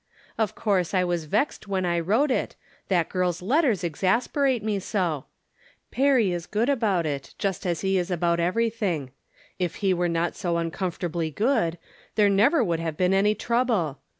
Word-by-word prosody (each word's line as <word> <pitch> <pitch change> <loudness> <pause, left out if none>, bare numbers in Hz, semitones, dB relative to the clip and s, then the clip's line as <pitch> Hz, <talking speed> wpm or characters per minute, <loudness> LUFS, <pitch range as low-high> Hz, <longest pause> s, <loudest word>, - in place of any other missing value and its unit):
Of 220 -3 -1
course 195 -4 0
I 185 - +3
was 175 -3 -1
vexed 215 - -1
when 190 -2 -1
I 170 -1 +1
wrote 220 - +2
it, - - -1 0.3
hat 175 -4 +2
girl's 180 -2 0
letters 240 - +1
exasperate 230 - +1
me 210 -2 0
so! 175 - -2 0.6
Perry 260 -7 +3
is 175 -1 -4
ood 230 +5 +2
about 210 - +1
it, 140 -3 -4
just 195 -2 -2
as 170 -3 -1
he 190 -1 +1
is 175 - -3
about 170 -1 +1
everything. 185 - 0 0.5
If 180 +3 -3
e 190 -1 +4
were 175 -1 0
not 170 +1 -1
so 175 -3 -1
uncomfortably 170 -1 -2
good, 205 - +1 0.4
there 210 -2 +4
never 235 +8 +4
rould 170 -3 0
have 165 -2 -3
been 185 +1 +2
any 205 +2 +3
trouble. 225 - 0
185 Hz, 170 wpm, -25 LUFS, 170-220 Hz, 0.6 s, e